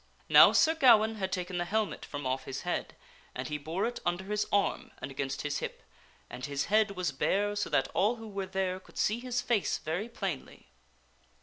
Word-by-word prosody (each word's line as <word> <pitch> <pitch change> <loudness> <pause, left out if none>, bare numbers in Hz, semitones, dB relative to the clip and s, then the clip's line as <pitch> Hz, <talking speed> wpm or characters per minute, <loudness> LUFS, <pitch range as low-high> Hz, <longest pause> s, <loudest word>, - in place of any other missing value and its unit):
Now, - - +9
Sir 320 - +4
Gawaine 225 -7 +5
had 190 -2 -2
taken 180 -1 -3
the 175 - -1
helmet 215 +3 -1
from 145 -1 -6
off 130 +1 -1
his 135 0 -5
head, - - -3 0.4
and 125 0 -4
he 150 0 -3
bore 160 +6 -2
it 240 +1 -3
under 175 +2 -1
his 210 +2 -1
arm 200 -1 +1
and - - -6
against 135 0 -3
his 145 -1 -1
hip, - - -6 0.4
and 125 - -9
his 140 +1 -2
head 215 -2 +3
was 180 -4 -1
bare 205 +9 0
so 205 - -1
that 135 - +2
all 215 +5 +2
who 225 -1 -10
were 195 -2 -4
there 190 -1 -1
could - - -18
see 215 +2 +1
his 245 0 -2
face 235 -6 +1
very 175 +9 -3
plainly. 190 - -6
190 Hz, 205 wpm, -30 LUFS, 150-215 Hz, 0.4 s, Now